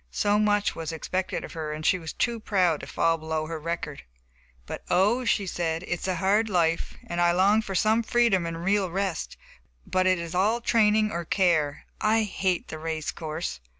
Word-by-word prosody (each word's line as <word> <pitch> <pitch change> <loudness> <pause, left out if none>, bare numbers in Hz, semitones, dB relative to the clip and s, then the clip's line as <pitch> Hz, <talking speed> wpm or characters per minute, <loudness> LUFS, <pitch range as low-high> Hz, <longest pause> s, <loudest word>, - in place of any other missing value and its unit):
So 205 - +1
much 205 -1 +2
was 165 0 -4
expected 185 +3 -3
of - - -8
her, 155 -2 -4
and 155 +1 -6
she 185 - +3
was 160 -1 -6
too 235 -1 -1
proud 185 -7 +1
to - - -9
fall 165 0 +1
below 160 0 -2
her 160 0 -5
record. 165 -2 -4 0.6
"But, - - -6
oh," 210 +8 +3
she 205 -2 +1
said, 165 -2 -2
"it - - -11
is 175 +1 -2
a 185 - 0
hard 200 +5 +2
life. 165 -3 +1
I 175 0 +2
long 195 +5 +4
for 195 -3 -5
some 215 +5 +3
freedom 225 -6 +2
and 165 0 -5
real 195 -1 +2
rest, 190 0 -3 0.5
but 185 0 +1
it 185 0 +4
is 170 -1 -5
all 205 +6 +2
training 215 -2 +3
or 170 +1 -3
care. 160 -5 +1 0.2
I 220 +1 +3
hate 190 -3 -1
the 155 - -6
race 160 -1 -3
course!" 155 - -5
180 Hz, 195 wpm, -26 LUFS, 165-205 Hz, 0.6 s, long